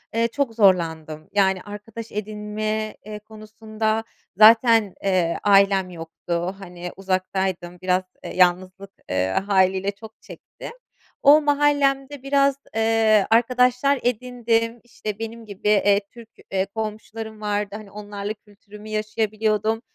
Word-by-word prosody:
ııı, 230 0 +2
çok 245 -2 -2
zorlandım, 160 -6 +1
yani, 190 -2 +2
arkadaş 210 +3 -9
edinme, 215 +1 -3
eee, 210 0 -7
konusunda 215 +1 -4 0.3
zaten, 225 -2 +6
eee, 185 -4 +1
ailem 195 -2 +4
yoktu, 170 +2 -4
hani, 180 -2 -8
uzaktaydım 185 -2 -2
biraz 185 0 +1 0.3
yalnızlık, 185 +2 +1 0.2
ııı, 95 +1 0
hâliyle 190 0 +1
çok 220 +2 -14
çektim. - - -11 0.5
O 295 +2 +7
mahallemde 285 -2 +1
biraz, 275 0 +2 0.2
ııı, 220 -2 +3
arkadaşlar 250 +4 +3
edindim, 240 -1 -1
işte, 215 -3 -7
benim 225 0 -7
gibi, 200 0 -6
eee, 205 -1 +4
Türk, 235 -2 -13 0.2
eee, 190 0 +1
komşularım 220 +1 -6
vardı, 205 -1 -2
hani, 210 -2 -10
onlarla 205 0 -6
kültürümü 210 0 -15
yaşayabiliyordum 215 0 -1
215 Hz, 115 wpm, -23 LUFS, 195-225 Hz, 0.5 s, O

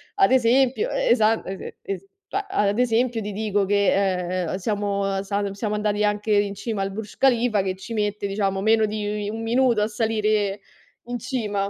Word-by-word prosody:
Ad 390 -6 +4
esempio, 260 - +3
e - - 0
esa 220 - +4
ese 190 0 -7
es 195 -1 -5 0.2
cioè, 400 0 -3
a 210 - +1
ad 200 +2 0
esempio, 240 -1 +1
ti 210 0 -4
dico 205 -1 0
che, 190 -2 +1
ehm, - - -2
siamo 200 -1 -1
salum 200 0 -2
siamo 210 +1 -2
andati 210 0 0
anche 210 +1 0
in 205 -1 +2
cima 200 +1 -3
al 195 0 -2
Burj 210 +1 -7
Khalifa 240 -5 +3
che 190 -1 -2
ci 190 +5 -8
mette 210 -1 -1
diciamo 195 -1 -1
meno 220 +1 +4
di 210 -1 -3
1 225 +2 -5
minuto 235 0 +2
a 210 - +2
salire 215 -2 0 0.4
in 245 0 -4
cima. 210 -5 -2
210 Hz, 185 wpm, -23 LUFS, 200-225 Hz, 0.4 s, Ad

